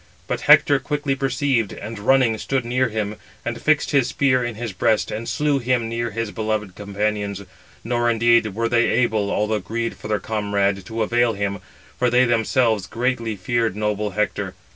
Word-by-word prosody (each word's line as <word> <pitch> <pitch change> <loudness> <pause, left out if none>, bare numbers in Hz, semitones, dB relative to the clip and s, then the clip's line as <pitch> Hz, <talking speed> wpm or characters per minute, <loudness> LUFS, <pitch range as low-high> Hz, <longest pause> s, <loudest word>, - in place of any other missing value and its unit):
But - - -3
Hector 140 -1 +7
quickly 145 0 -2
perceived, 130 -4 0
and 110 0 -7
running, 125 +1 +3
stood 135 -3 -1
near 125 +1 +1
him, 105 -1 -3 0.3
and 120 -1 -4
fixed 155 +1 +2
his 135 -4 +3
spear 130 -3 +2
in 120 -1 -3
his 115 -2 -5
breast, 105 +4 +1
and 110 +2 -4
slew 150 -2 +1
him 120 -2 0
near 115 +1 -2
his 115 0 -4
beloved 110 -3 -2
companions, 100 0 -3 0.4
nor 120 +1 0
indeed 115 -2 +3
were 115 +1 0
they 120 0 +2
able, 110 -5 +1
although 105 +1 0
grieved 115 +5 -4
for - - -7
their 105 -1 +1
comrade, 100 -2 -1
to 115 0 -2
avail 120 +1 +2
him, 100 -1 -2 0.4
for 125 - +3
they 125 +1 +4
themselves 115 -3 +1
greatly 115 -2 -1
feared 115 +2 -1
noble 105 0 -1
Hector. 105 0 -2
115 Hz, 175 wpm, -22 LUFS, 105-120 Hz, 0.4 s, Hector